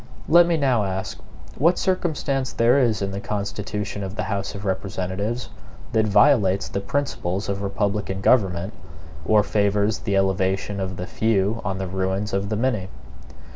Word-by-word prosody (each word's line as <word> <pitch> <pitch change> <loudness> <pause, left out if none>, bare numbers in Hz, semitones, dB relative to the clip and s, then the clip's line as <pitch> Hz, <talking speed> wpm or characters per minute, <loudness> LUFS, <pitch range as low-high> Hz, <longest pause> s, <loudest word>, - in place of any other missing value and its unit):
Let 170 +1 +6
me 170 -1 +2
now 130 -7 +2
ask 95 -1 -4 0.4
what 170 +6 +4
circumstance 150 -8 -1
there 120 +4 +3
is 115 -6 +1
in 95 - -2
the 100 - -4
constitution 105 0 -4
of 95 +1 -5
the - - -2
House 100 0 -3
of 100 +1 -7
Representatives 95 +4 -3 0.4
that 110 -2 +2
violates 100 -4 +4
the 100 - -3
principles 100 -8 -2
of 100 0 -2
republican 100 -1 -1
government, 95 -3 +2 0.5
or 105 -1 +5
favors 105 +1 +1
the 100 - -1
elevation 95 +1 0
of 95 -1 -3
the 90 - -4
few 110 0 0
on 95 -1 -2
the 95 - -3
ruins 95 +2 -2
of 100 +1 -1
the 110 - 0
many? 110 -5 -1
100 Hz, 160 wpm, -23 LUFS, 95-115 Hz, 0.5 s, Let